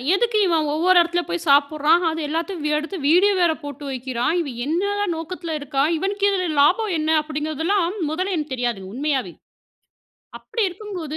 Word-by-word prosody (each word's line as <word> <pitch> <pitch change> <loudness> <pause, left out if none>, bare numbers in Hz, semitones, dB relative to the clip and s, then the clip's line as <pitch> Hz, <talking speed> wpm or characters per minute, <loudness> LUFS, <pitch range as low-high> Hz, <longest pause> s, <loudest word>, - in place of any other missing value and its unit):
"எதுக்கு 450 +1 +1
இவன் 320 -3 +1
ஒவ்வொரு 355 +3 +3
எடத்துல 345 +1 0
போய் 345 -1 -3
சாப்பிடுறான்? 300 +4 +4
அது 320 - -3
எல்லாத்தையும் 330 +2 -3
வ் 300 - +1
எடுத்து 325 +5 -4
வீடியோ 385 +5 +5
வேற 340 -2 +4
போட்டு 285 0 -8
வைக்கிறான்! 255 +1 -2
இவன் 260 -7 -6
என்னதான் 395 +4 -1
நோக்கத்ல 330 0 -5
இருக்கான்? 285 +1 0
இவனுக்கு 400 +3 0
இதில 370 -2 0
லாபம் 385 +7 +3
என்ன?" 310 +1 -1
அப்படிங்கிறதெல்லாம் 315 +5 -1 0.2
முதல்ல 370 +3 -1
எனக்கு 300 -3 -4
தெரியாதுங்க, 235 -7 -3
உண்மையாவே. 265 - -1 1.1
அப்படி 460 - -3
இருக்கும்போது, 360 -5 -7
320 Hz, 155 wpm, -22 LUFS, 295-370 Hz, 1.1 s, வீடியோ